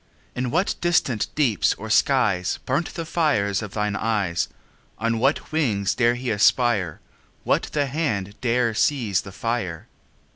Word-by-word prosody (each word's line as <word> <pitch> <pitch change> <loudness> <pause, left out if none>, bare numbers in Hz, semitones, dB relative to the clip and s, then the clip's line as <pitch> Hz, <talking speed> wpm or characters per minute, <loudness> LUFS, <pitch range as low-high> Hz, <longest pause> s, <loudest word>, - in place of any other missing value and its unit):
In 125 0 -2
what 175 +9 +1
distant 150 -10 +1
deeps 130 -9 +2
or 110 +1 -7
skies 105 -8 +2
5 - - -17
Burnt 140 +6 -1
the 165 - -4
fire 155 -11 +1 0.2
of 105 -3 -7
thine 105 -1 -1
eyes? 105 -6 0 0.5
On 115 +1 0
what 135 +5 0
wings 110 -11 +1
dare 120 0 +2
he 125 0 -3
aspire? 105 - +2 0.4
What - - +1
the 145 -1 +1
hand 130 - -2
dare 120 -1 +1
seize 110 -4 +1
the 95 - -10
fire? 95 -5 -3
115 Hz, 150 wpm, -23 LUFS, 100-135 Hz, 0.5 s, deeps